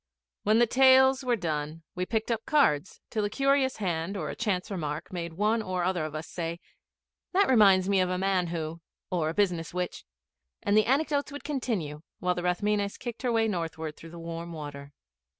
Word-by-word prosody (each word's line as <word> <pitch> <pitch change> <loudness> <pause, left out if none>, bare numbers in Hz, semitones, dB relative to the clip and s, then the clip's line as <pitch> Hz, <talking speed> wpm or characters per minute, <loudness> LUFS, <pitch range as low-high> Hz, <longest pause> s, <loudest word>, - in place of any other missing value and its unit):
When 215 +1 +3
the 240 - +6
tales 265 +2 +5
were 250 -2 +2
done 160 -4 -3
we 180 0 -3
picked 220 +1 -1
up 225 -1 -2
cards 195 - +2
till 215 - 0
a 205 - 0
curious 275 +2 +2
hand 180 -1 -2
or 155 - -3
a - - -7
chance 200 -4 -1
remark 155 -2 -4
made 170 -2 -4
one 215 +5 +1
or 185 -3 -2
other 175 -3 0
of 155 0 -6
us 155 +1 -5
say, 170 -1 -4 0.7
'That 395 +2 +4
reminds 195 -6 +6
me 200 -1 +3
of 185 -1 +2
a 180 - 0
man 190 -1 +1
who 165 -1 -4 0.3
or 165 -4 +1
a 165 - -4
business 180 -5 0
which 180 -1 -3 0.3
' 65 -1 -37
and 205 - +2
the 215 -1 +4
anecdotes 285 +2 +1
would 285 - -7
continue 215 - -2 0.2
while 180 0 0
the 175 - -4
Rathmines 200 +3 0
kicked 240 -2 -6
her 250 - 0
way 225 -1 +2
northward 165 -5 -3
through 165 - -12
the 170 - -10
warm 170 0 -6
water. 145 -2 -8
185 Hz, 205 wpm, -28 LUFS, 165-225 Hz, 0.7 s, the